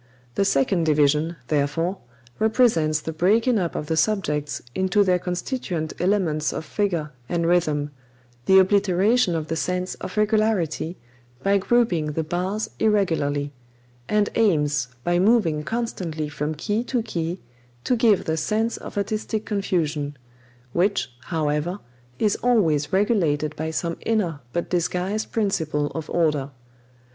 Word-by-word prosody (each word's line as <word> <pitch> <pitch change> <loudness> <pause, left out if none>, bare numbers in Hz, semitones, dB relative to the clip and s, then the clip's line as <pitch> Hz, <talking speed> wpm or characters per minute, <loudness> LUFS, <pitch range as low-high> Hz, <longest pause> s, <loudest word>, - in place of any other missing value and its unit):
The 195 - +1
second 165 +1 +2
division, 150 +2 +3
therefore, 160 +6 0 0.4
represents 215 -10 +3
the 160 - -5
breaking 220 +8 +3
up 175 -3 -2
of - - -3
the 160 - -1
subjects 155 -5 0
into 190 +4 +2
their 180 -2 +2
constituent 180 - -3
elements 175 -6 +1
of - - -5
figure 170 -6 -1 0.2
and 170 -1 0
rhythm, 155 -4 +1 0.6
the 190 - +7
obliteration 195 +2 +3
of 160 -1 -3
the 165 - -2
sense 180 +3 -2
of 185 +3 -6
regularity 210 -6 +1 0.5
by 200 0 +3
grouping 185 -9 +1
the 160 - -1
bars 185 +6 -2
irregularly; 160 -9 +1 0.6
and 210 -1 +2
aims, 150 - +2 0.2
by 175 0 +2
moving 190 -7 +3
constantly 180 -8 -3
from 150 +1 -3
key 210 +9 -1
to 245 -2 -1
key, 175 -4 -3 0.4
to 250 - +2
give 225 -4 +3
the 160 0 -1
sense 215 +8 0
of - - -9
artistic 215 +1 -2
confusion; 155 -8 -1 0.6
which, 175 -9 +1
however, 155 +2 -1 0.4
is 210 -2 +2
always 170 -12 +2
regulated 170 -8 +1
by 160 +1 -3
some 165 +1 -2
inner 195 -10 0
but 170 - -2
disguised 180 +4 -1
principle 160 -9 0
of 160 -2 -5
order. 150 -5 +1
175 Hz, 135 wpm, -23 LUFS, 155-205 Hz, 0.6 s, the